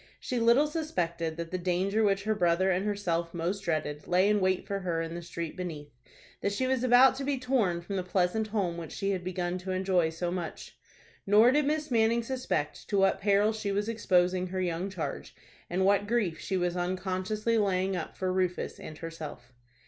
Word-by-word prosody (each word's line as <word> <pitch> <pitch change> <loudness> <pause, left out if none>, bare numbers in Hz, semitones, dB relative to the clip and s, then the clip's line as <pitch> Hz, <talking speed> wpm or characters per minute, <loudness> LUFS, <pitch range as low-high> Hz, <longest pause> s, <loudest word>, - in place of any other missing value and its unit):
She 250 - -2
little 235 +5 +5
suspected 170 - -2
that 170 -1 -5
the 185 - -2
danger 190 +4 +1
which 200 -1 +2
her 215 +1 +1
brother 185 -1 +2
and 185 +1 +1
herself 170 -5 -1
most 175 +4 -1
dreaded 155 -4 -2
lay 185 +2 +3
in 210 0 +3
wait 185 -1 +1
for 200 -1 -2
her 175 -3 -2
in 165 0 -3
the 175 - -5
street 170 -1 -6
beneath; 160 -5 -6 0.5
that 200 - 0
she 260 +6 0
was 260 -1 0
about 255 +1 +7
to 275 - -3
be 280 0 0
torn 245 -10 +1
from 195 +3 -4
the 185 - -1
pleasant 185 +4 0
home 195 -6 -1
which 165 -2 -7
she 195 0 -1
had 185 -2 -2
begun 180 0 -2
to 185 +1 -8
enjoy 185 -3 +1
so 170 +2 -3
much. 175 -2 -5 0.5
Nor 215 +5 +6
did 290 +1 +2
Miss 305 -1 -1
Manning 230 0 +3
suspect 250 - -3
to 200 - +1
what 195 0 +3
peril 205 +2 +3
she 215 -2 -3
was 205 +2 -1
exposing 185 -5 +2
her 185 +1 -4
young 180 +1 -1
charge, 185 -5 -5 0.3
and 185 +2 +1
what 200 +1 +3
grief 205 -8 0
she 190 - -2
was 175 -1 0
unconsciously 185 +5 -1
laying 190 -1 +1
up 165 -3 -5
for 185 -1 -1
Rufus 185 -1 -1
and 155 - -9
herself. 155 -7 -8
185 Hz, 200 wpm, -29 LUFS, 175-210 Hz, 0.5 s, about